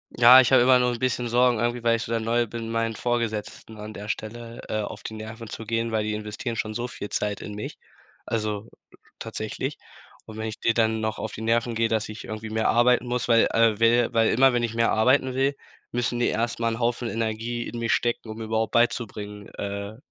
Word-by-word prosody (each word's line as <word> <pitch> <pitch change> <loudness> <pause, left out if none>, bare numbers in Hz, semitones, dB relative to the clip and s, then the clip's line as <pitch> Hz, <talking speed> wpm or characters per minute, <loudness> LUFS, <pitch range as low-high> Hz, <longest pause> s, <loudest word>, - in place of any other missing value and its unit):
Ja, 125 +2 +9
ich 130 0 +4
habe 130 - +7
immer 125 +1 +6
nur 125 0 +2
'n 120 - -6
bisschen 125 -1 0
Sorgen 120 0 +3
irgendwie, 120 +1 -1
weil 115 0 +3
ich 115 - -4
so 115 - -4
dann 115 -1 0
neu 120 +1 +1
bin, 115 +1 -6
meinen 115 -1 -1
Vorgesetzten 110 -2 -3
an 105 +1 -8
der 105 0 -8
Stelle, 115 +2 -6
äh, 110 - -1
auf 105 - -7
die - - -6
Nerven 110 +1 -8
zu 115 - -7
gehen, 115 +1 -1
weil 110 -1 0
die 110 - -1
investieren 105 +3 -4
schon 110 -1 -3
so 120 +2 -3
viel 105 -4 -7
Zeit 105 -1 -2
in 105 - -7
mich, 105 - -6 0.5
also 110 -1 -3 0.5
tatsächlich. - - -4 0.5
Und 110 - -10
wenn 110 0 -3
ich 110 - -6
den 115 - +3
dann 110 -1 +2
noch 110 0 -2
auf 110 - -5
die - - -7
Nerven 115 +1 +1
gehe, 115 0 +1
dass 110 -1 0
ich 110 0 -8
irgendwie 110 0 -6
mehr 110 0 +1
arbeiten 125 +1 +4
muss, 125 0 -2
weil 115 -1 +5
äh, 115 -2 +3
will 115 +1 +5
weil 115 -1 +4
immer 130 +2 +5
wenn 120 -1 +1
ich 115 -1 -1
mehr 115 0 +2
arbeiten 130 +4 +3
will, 135 +2 +1 0.3
müssen 120 0 -1
die 120 - +2
erst 115 +1 -1
mal 115 - +2
'n 115 - -5
Haufen 120 0 0
Energie 115 +1 -2
in 120 - -6
mich 115 -1 -1
stecken, 120 -1 -1
um 110 - -6
mir 115 - -5
überhaupt 110 0 -1
beizubringen, 105 -3 -1
äh 100 +1 -5
115 Hz, 235 wpm, -25 LUFS, 110-120 Hz, 0.5 s, Ja